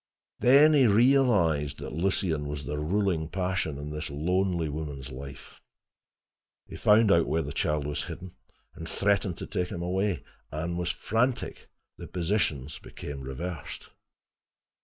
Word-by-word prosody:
Then 145 Hz, +5 st, +7 dB
he 135 Hz, -4 st, +6 dB
realized 100 Hz, -, +3 dB
that -, -, -7 dB
Lucien 80 Hz, -3 st, 0 dB
was 75 Hz, -1 st, -4 dB
the 75 Hz, +2 st, -3 dB
ruling 85 Hz, -1 st, 0 dB
passion 90 Hz, -5 st, -1 dB
in 75 Hz, +1 st, -6 dB
this 75 Hz, +1 st, -4 dB
lonely 85 Hz, +3 st, 0 dB
woman's 70 Hz, -3 st, -5 dB
life. 70 Hz, +1 st, -10 dB, 1.0 s
He -, -, -10 dB
found 105 Hz, 0 st, +5 dB
out 85 Hz, -3 st, +4 dB
where 80 Hz, +1 st, +1 dB
the 70 Hz, -, -6 dB
child 75 Hz, -1 st, 0 dB
was 75 Hz, 0 st, -2 dB
hidden, 90 Hz, -1 st, -8 dB, 0.4 s
and 80 Hz, -, -7 dB
threatened 100 Hz, -3 st, +1 dB
to -, -, -5 dB
take 90 Hz, -, -2 dB
him 85 Hz, -1 st, -5 dB
away. 95 Hz, -2 st, 0 dB, 0.3 s
Anne 80 Hz, +3 st, -3 dB
was 90 Hz, 0 st, -1 dB
frantic. 120 Hz, +7 st, -1 dB, 0.3 s
The -, -, -7 dB
positions 85 Hz, -6 st, -1 dB
became 70 Hz, -1 st, -8 dB
reversed. 75 Hz, +5 st, -6 dB
85 Hz, 140 wpm, -28 LUFS, 75-100 Hz, 1.0 s, Then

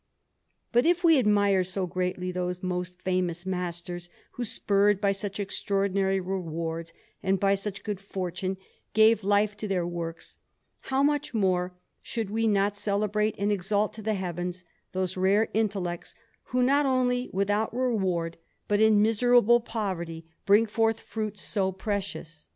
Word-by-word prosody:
But 240 Hz, +5 st, +4 dB
if 350 Hz, +1 st, +2 dB
we 325 Hz, -4 st, +6 dB
admire 205 Hz, -4 st, +3 dB
so 185 Hz, +1 st, -2 dB
greatly 180 Hz, 0 st, -2 dB
those 180 Hz, 0 st, -3 dB
most 180 Hz, 0 st, -3 dB
famous 180 Hz, -2 st, -1 dB
masters 175 Hz, -1 st, -4 dB, 0.2 s
who, 245 Hz, -, -4 dB
spurred 205 Hz, -2 st, +2 dB
by 200 Hz, -1 st, +2 dB
such 195 Hz, +1 st, -4 dB
extraordinary 195 Hz, -1 st, 0 dB
rewards 165 Hz, -3 st, -4 dB, 0.3 s
and 190 Hz, 0 st, +1 dB
by 195 Hz, +1 st, +3 dB
such 200 Hz, +1 st, -4 dB
good 210 Hz, -3 st, -3 dB
fortune, 190 Hz, -1 st, -4 dB, 0.4 s
gave 220 Hz, 0 st, +5 dB
life 205 Hz, +1 st, +2 dB
to 215 Hz, -, -4 dB
their 185 Hz, -3 st, 0 dB
works, 170 Hz, -1 st, -6 dB, 0.5 s
how 265 Hz, +1 st, +2 dB
much 290 Hz, -3 st, 0 dB
more 185 Hz, -3 st, +1 dB, 0.3 s
should 225 Hz, -4 st, -4 dB
we 225 Hz, +1 st, +1 dB
not 205 Hz, -1 st, +2 dB
celebrate 210 Hz, +1 st, 0 dB
and 200 Hz, +1 st, 0 dB
exalt 205 Hz, +2 st, 0 dB
to 220 Hz, -, -8 dB
the 215 Hz, 0 st, 0 dB
heavens 180 Hz, -1 st, -4 dB, 0.3 s
those 185 Hz, 0 st, -2 dB
rare 195 Hz, +4 st, +3 dB
intellects 195 Hz, -5 st, -2 dB, 0.3 s
who, 250 Hz, 0 st, +1 dB
not 280 Hz, +3 st, +3 dB
only 250 Hz, -1 st, +1 dB
without 205 Hz, +3 st, 0 dB
reward, 190 Hz, -9 st, 0 dB, 0.3 s
but 205 Hz, 0 st, +2 dB
in 215 Hz, -1 st, +5 dB
miserable 240 Hz, +1 st, +5 dB
poverty, 175 Hz, -8 st, -4 dB, 0.2 s
bring 205 Hz, +3 st, +6 dB
forth 225 Hz, +1 st, +1 dB
fruits 215 Hz, -2 st, -5 dB
so 190 Hz, -2 st, 0 dB
precious? 190 Hz, -5 st, -5 dB
200 Hz, 145 wpm, -27 LUFS, 180-215 Hz, 0.5 s, we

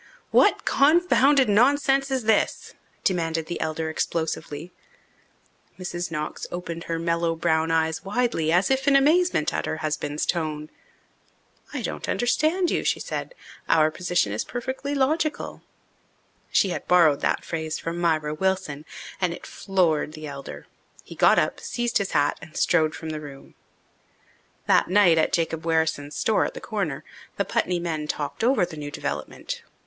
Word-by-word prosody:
"What -, -, +4 dB
confounded 285 Hz, -2 st, +4 dB
nonsense 275 Hz, +5 st, +3 dB
is 265 Hz, -2 st, -1 dB
this?" 220 Hz, 0 st, +1 dB, 0.3 s
demanded 165 Hz, -3 st, 0 dB
the 175 Hz, -, -5 dB
elder 160 Hz, 0 st, -2 dB
explosively. 160 Hz, 0 st, -3 dB, 1.1 s
Mrs. 175 Hz, -1 st, -4 dB
Knox 155 Hz, -2 st, -4 dB
opened 170 Hz, -1 st, -5 dB
her 165 Hz, -, -2 dB
mellow 170 Hz, 0 st, 0 dB
brown 160 Hz, -1 st, +1 dB
eyes 160 Hz, 0 st, 0 dB
widely, 200 Hz, -6 st, 0 dB
as 180 Hz, +8 st, +3 dB
if 270 Hz, +1 st, +1 dB
in 280 Hz, -, +5 dB
amazement 310 Hz, -, +3 dB
at -, -, -2 dB
her 155 Hz, -, -2 dB
husband's 150 Hz, -1 st, -2 dB
tone. 155 Hz, -3 st, -2 dB, 1.0 s
"I -, -, -4 dB
don't -, -, -4 dB
understand 315 Hz, +9 st, +1 dB
you," -, -, 0 dB
she -, -, +1 dB
said. -, -, -5 dB, 0.3 s
"Our 155 Hz, -1 st, +4 dB
position 175 Hz, -, 0 dB
is 105 Hz, -, -1 dB
perfectly 260 Hz, +4 st, -4 dB
logical." 300 Hz, +3 st, -1 dB, 0.9 s
She 195 Hz, -, +3 dB
had -, -, -4 dB
borrowed 165 Hz, -5 st, +5 dB
that -, -, 0 dB
phrase 160 Hz, -1 st, -3 dB
from 165 Hz, +1 st, -4 dB
Myra 155 Hz, -3 st, +1 dB
Wilson, 170 Hz, -4 st, -2 dB, 0.4 s
and 175 Hz, -2 st, +1 dB
it -, -, -12 dB
floored 170 Hz, -6 st, 0 dB
the 155 Hz, 0 st, -8 dB
elder. 140 Hz, -2 st, -8 dB, 0.4 s
He -, -, -11 dB
got -, -, +4 dB
up, -, -, +1 dB
seized 240 Hz, -1 st, -1 dB
his 200 Hz, -, -3 dB
hat, 145 Hz, -2 st, +2 dB
and 155 Hz, -, -11 dB
strode 155 Hz, -1 st, +2 dB
from 160 Hz, -, -7 dB
the 155 Hz, -1 st, -5 dB
room. 140 Hz, -2 st, -11 dB, 1.1 s
That -, -, +4 dB
night, 180 Hz, -4 st, +5 dB
at 155 Hz, -, +2 dB
Jacob 165 Hz, -1 st, 0 dB
Wherrison's 160 Hz, -3 st, 0 dB
store 220 Hz, -, +2 dB
at -, -, -3 dB
the -, -, -5 dB
Corner, 195 Hz, -, -3 dB, 0.3 s
the -, -, 0 dB
Putney 180 Hz, -1 st, 0 dB
men 160 Hz, -3 st, -3 dB
talked 150 Hz, +7 st, -3 dB
over 245 Hz, -5 st, +3 dB
the 170 Hz, -3 st, -10 dB
new 145 Hz, -1 st, -5 dB
development. -, -, -5 dB
170 Hz, 155 wpm, -25 LUFS, 155-235 Hz, 1.1 s, in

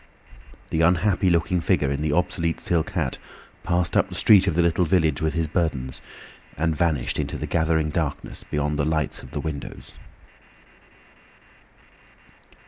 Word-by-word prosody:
The 80 Hz, -, +1 dB
unhappy 90 Hz, +3 st, +3 dB
looking 85 Hz, +1 st, +1 dB
figure 70 Hz, -3 st, +1 dB
in 70 Hz, +1 st, -2 dB
the 75 Hz, -1 st, 0 dB
obsolete 85 Hz, 0 st, 0 dB
silk 85 Hz, -3 st, 0 dB
hat -, -, -2 dB, 0.4 s
passed 85 Hz, -1 st, 0 dB
up -, -, +3 dB
the -, -, -7 dB
street 100 Hz, -3 st, +5 dB
of 85 Hz, -, +1 dB
the 85 Hz, -, +3 dB
little 85 Hz, +1 st, +2 dB
village 80 Hz, -5 st, +1 dB
with 80 Hz, 0 st, 0 dB
his 80 Hz, -1 st, 0 dB
burdens, 75 Hz, -6 st, -2 dB, 0.6 s
and 80 Hz, +2 st, 0 dB
vanished 75 Hz, -5 st, 0 dB
into -, -, -3 dB
the -, -, -4 dB
gathering 80 Hz, -1 st, +1 dB
darkness 80 Hz, -3 st, -3 dB
beyond 75 Hz, 0 st, -2 dB
the -, -, +2 dB
lights 80 Hz, -3 st, -1 dB
of -, -, -12 dB
the -, -, -5 dB
windows. 80 Hz, -3 st, -7 dB
80 Hz, 150 wpm, -24 LUFS, 75-85 Hz, 0.6 s, street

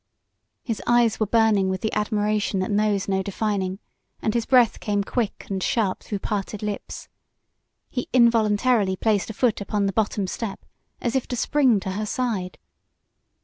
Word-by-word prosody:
His 225 Hz, -4 st, -3 dB
eyes 240 Hz, -2 st, +3 dB
were 215 Hz, -, +1 dB
burning 215 Hz, -3 st, +3 dB
with 190 Hz, -1 st, -2 dB
the 220 Hz, -, -2 dB
admiration 210 Hz, -1 st, 0 dB
that 185 Hz, +2 st, -1 dB
knows 205 Hz, -1 st, +1 dB
no 190 Hz, -1 st, +1 dB
defining, 195 Hz, -1 st, -2 dB, 0.4 s
and 215 Hz, -, -1 dB
his 235 Hz, -1 st, -1 dB
breath 250 Hz, -4 st, +4 dB
came 205 Hz, -1 st, 0 dB
quick 225 Hz, 0 st, -2 dB
and 190 Hz, -1 st, -3 dB
sharp 200 Hz, -2 st, 0 dB
through 205 Hz, -, -4 dB
parted 205 Hz, +1 st, -4 dB
lips. 210 Hz, -1 st, -5 dB, 0.8 s
He 250 Hz, -, -4 dB
involuntarily 225 Hz, -3 st, +3 dB
placed 210 Hz, +1 st, 0 dB
a -, -, -4 dB
foot 230 Hz, -3 st, +1 dB
upon 200 Hz, 0 st, -1 dB
the 195 Hz, -, -1 dB
bottom 210 Hz, -2 st, 0 dB
step 195 Hz, +2 st, -5 dB, 0.4 s
as 240 Hz, +1 st, -1 dB
if 265 Hz, -, 0 dB
to 245 Hz, -, -3 dB
spring 255 Hz, -3 st, +3 dB
to 190 Hz, -, -4 dB
her 210 Hz, +3 st, -3 dB
side. 220 Hz, -9 st, -2 dB
210 Hz, 165 wpm, -24 LUFS, 200-230 Hz, 0.8 s, breath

